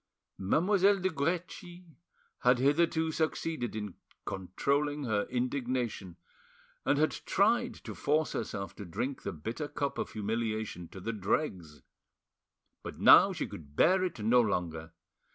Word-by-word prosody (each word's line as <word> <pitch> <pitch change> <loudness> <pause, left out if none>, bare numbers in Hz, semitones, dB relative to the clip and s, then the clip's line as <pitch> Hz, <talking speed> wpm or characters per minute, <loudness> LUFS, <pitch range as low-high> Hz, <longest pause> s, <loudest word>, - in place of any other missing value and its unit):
Mademoiselle 195 - +3
de 185 0 0
Guerchi 175 +3 -3 0.5
had 125 0 +4
hitherto 160 +4 +2
succeeded 155 -6 -2
in 105 -3 -4 0.3
controlling 140 +11 -1
her 105 -5 0
indignation, 125 -7 -2 0.7
and - - +2
had 155 +1 +3
tried 235 +5 +1
to - - -9
force 155 +2 0
herself 100 -3 -4
to - - -8
drink 125 +10 -4
the 100 - -4
bitter 115 - -5
cup 140 -2 -3
of - - -4
humiliation 110 -4 -3
to 95 - -11
the 115 +5 -3
dregs; 95 - -2 1.0
but - - -8
now - - +8
she - - -3
could 75 -3 -11
bear 185 - +4
it 185 - -2
no 120 +3 +5
longer. 85 -6 -2
125 Hz, 135 wpm, -31 LUFS, 100-160 Hz, 1.0 s, now